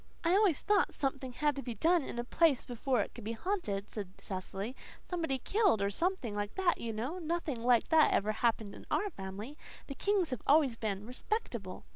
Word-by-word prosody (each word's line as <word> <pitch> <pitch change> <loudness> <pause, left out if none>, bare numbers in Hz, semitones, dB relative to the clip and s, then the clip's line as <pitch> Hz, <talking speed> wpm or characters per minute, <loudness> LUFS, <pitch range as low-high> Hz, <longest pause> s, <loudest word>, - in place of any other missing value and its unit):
"I 335 - +3
always 390 -7 +4
thought 410 -2 +2
something 270 -2 -2
had 295 +3 +1
to - - -2
be 240 -4 -5
done 335 - +3
in 265 - -6
a 240 - -1
place 300 +2 +3
before 245 0 0
it - - -5
could 235 - -9
be 225 +2 -3
haunted," 225 - -2
said 200 -4 -5
Cecily. 195 +4 -4 0.3
"Somebody 325 -7 -1
killed 395 - +2
or 200 0 +1
something 335 - -1
like 205 0 -3
that, 375 -2 +2
you 230 - -2
know. 250 +12 -3
Nothing 325 -7 -2
like 240 -1 +3
that 320 -2 +6
ever 210 +2 +2
happened 220 -2 0
in - - -12
our 415 - 0
family. 205 - -7 0.3
The 275 - -6
Kings 390 0 +1
have 255 - -3
always 285 -5 +5
been 210 -3 -3
respectable." 240 - -4
255 Hz, 200 wpm, -33 LUFS, 215-335 Hz, 0.3 s, that